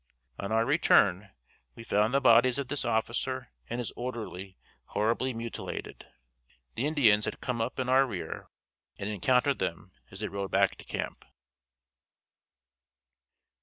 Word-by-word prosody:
On 100 +1 -4
our 115 +1 +3
return 105 - +4
trip 100 -1 -19 0.4
we 115 - -9
found 105 0 +2
the 140 - +3
bodies 120 0 +5
of 140 -3 -3
this 145 - -2
officer 120 +2 -1 0.2
and 120 - -3
his 120 -2 -3
orderly 110 -6 -6 0.3
horribly 115 +5 0
mutilated. 115 -1 -6 0.7
The 135 - -1
Indians 115 -9 +4
had - - -4
come 120 -2 -2
up 115 +3 -2
in 130 - -1
our 130 +1 +5
rear 100 -7 -6 0.5
and 100 - -4
encountered 125 +6 +2
them 85 +3 -3 0.2
as 95 +2 -9
they 105 - -1
rode 100 -1 -4
back 100 0 +3
to - - -13
camp. - - -4
115 Hz, 145 wpm, -29 LUFS, 105-130 Hz, 0.7 s, bodies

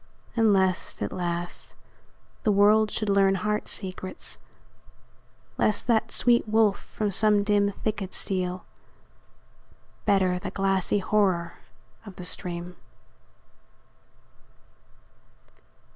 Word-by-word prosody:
And 225 -2 +4
lest, 190 -2 0
at - - -3
last, 175 -1 -4 0.7
the 215 - +2
world 210 +2 +4
should 215 +1 -3
learn 195 -1 +3
heart 210 +2 -2
secrets; 185 -1 -5 1.2
Lest 215 - +2
that 230 -3 +1
sweet 240 -2 +3
wolf 215 -2 +3
from 210 -2 -4
some 210 +1 +3
dim 205 -1 +2
thicket 205 -2 -4
steal; 185 -1 -1 1.4
Better 185 -2 +2
the 195 - -5
glassy 195 0 +1
horror 190 -4 +1 0.5
of 200 -4 -11
the 180 - -8
stream. 175 0 -3
195 Hz, 100 wpm, -26 LUFS, 185-210 Hz, 1.4 s, And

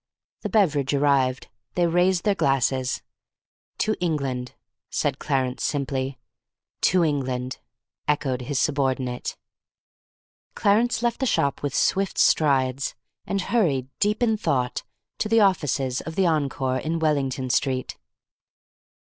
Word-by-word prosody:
The - - -3
beverage 150 -10 +2
arrived. 135 -2 +2 0.3
They 175 - +3
raised 175 +1 +2
their 205 - +3
glasses. 130 -5 0 0.7
"To 215 0 +1
England," 135 -7 -2 0.3
said - - -1
Clarence 130 -3 -1
simply. 135 -2 -2 0.6
"To 180 -1 +4
England," 130 -4 -1 0.5
echoed 135 -4 0
his 140 +2 -3
subordinate. 130 -4 -1 1.2
Clarence 225 +3 +2
left 235 -1 0
the 265 - +1
shop 140 -10 +1
with 145 -2 -2
swift 195 -2 +1
strides, 135 -3 +2 0.3
and 195 0 0
hurried, 160 - +1
deep 210 +3 +1
in 220 -2 +2
thought, 130 - 0 0.4
to 215 - -1
the 225 0 +5
offices 140 -9 +1
of 160 - -7
the 190 - +2
Encore 140 -5 0
in 160 +4 -2
Wellington 140 -5 0
Street. 130 -1 0
140 Hz, 120 wpm, -24 LUFS, 130-180 Hz, 1.2 s, the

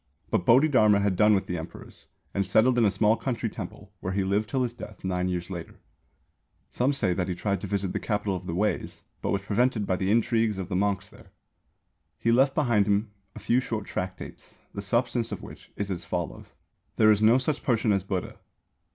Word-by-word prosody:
But 90 - 0
Bodhidharma 115 -6 +5
had 100 -2 +1
done 105 +3 +5
with 95 - -1
Emperors, 85 -2 -8 0.3
and 100 - +1
settled 115 +6 +3
in 115 - +4
a - - +5
small 105 +3 +3
country 115 -3 -3
temple, 100 0 -9
where 95 - -3
he 100 0 +1
lived 100 +3 0
till 130 -1 0
his 120 -1 -2
death 105 -4 -10
nine 90 -1 -1
years 90 0 -3
later. 85 -3 -7 1.0
Some 125 +3 +1
say 110 -10 0
that 90 0 -1
he 90 - -2
tried 100 0 -1
to - - -4
visit 100 -1 -2
the - - -1
Capital 105 -2 -1
of 90 - -7
the 85 - -3
Weis, 105 +3 -1 0.2
but - - -2
was 100 -1 0
prevented 110 +1 +1
by 95 -1 0
the 95 +1 -1
intrigues 115 -1 +2
of 95 -1 -5
the 95 - -2
monks 100 0 0
there. - - -17 0.9
He 115 - +1
left 135 +3 +4
behind 115 -9 +2
him 100 +1 +1 0.2
a - - -7
few 120 - +2
short 110 -5 -3
tractates, 95 0 -6 0.2
the 100 - -4
substance 120 +3 0
of - - -5
which - - -12
is 100 -1 -3
as 90 -2 -4
follows: 85 -2 -4 0.5
There 110 0 +5
is 105 0 +2
no 110 +3 +6
such 140 +3 -1
person 115 -3 +1
as 100 -2 +1
Buddha. 95 -2 -4
105 Hz, 210 wpm, -27 LUFS, 95-115 Hz, 1.0 s, no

